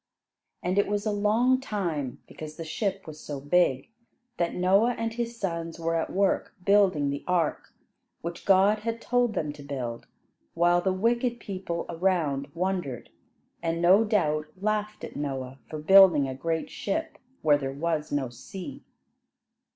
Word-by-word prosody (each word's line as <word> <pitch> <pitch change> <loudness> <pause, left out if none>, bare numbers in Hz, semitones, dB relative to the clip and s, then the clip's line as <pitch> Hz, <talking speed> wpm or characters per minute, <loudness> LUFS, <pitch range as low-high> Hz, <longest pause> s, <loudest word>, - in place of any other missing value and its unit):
And 185 +3 +1
it 200 - +2
was 205 +1 -1
a 215 - +1
long 220 +5 +3
time, 170 - -3
because 155 -1 -9
this 165 -2 -6
ship 195 +3 -2
was 155 -1 -9
so 145 -2 -6
big, 145 - +1 0.5
that 170 -1 0
Noah 195 +7 +3
and 230 0 -2
his 235 0 -4
sons 165 -3 -3
were 165 0 -1
at 165 -1 0
work 195 0 +1
building 190 -8 +4
the 140 - -4
ark, 175 -4 0 0.5
which 170 +1 -6
God 200 +2 +4
had 230 +2 -3
told 245 -2 +1
them 150 -2 -2
to 150 - -12
build, 130 -5 -5 0.5
while 175 +1 +4
the 190 - +1
wicked 235 +5 +1
people 185 -5 -4
around 165 -6 0
wondered, 175 -8 -2 0.5
and 165 0 -1
no 185 +5 +6
doubt 155 -8 +1
laughed 215 +1 -2
at - - -7
Noah 135 -2 -4
for 155 - -5
building 165 -3 +7
a 130 - -4
great 160 +4 -2
ship 320 +11 -3 0.2
where 145 -2 +5
there 135 -1 -3
was 155 +1 -2
no 140 -3 0
sea. 195 - -9
175 Hz, 160 wpm, -27 LUFS, 150-205 Hz, 0.5 s, building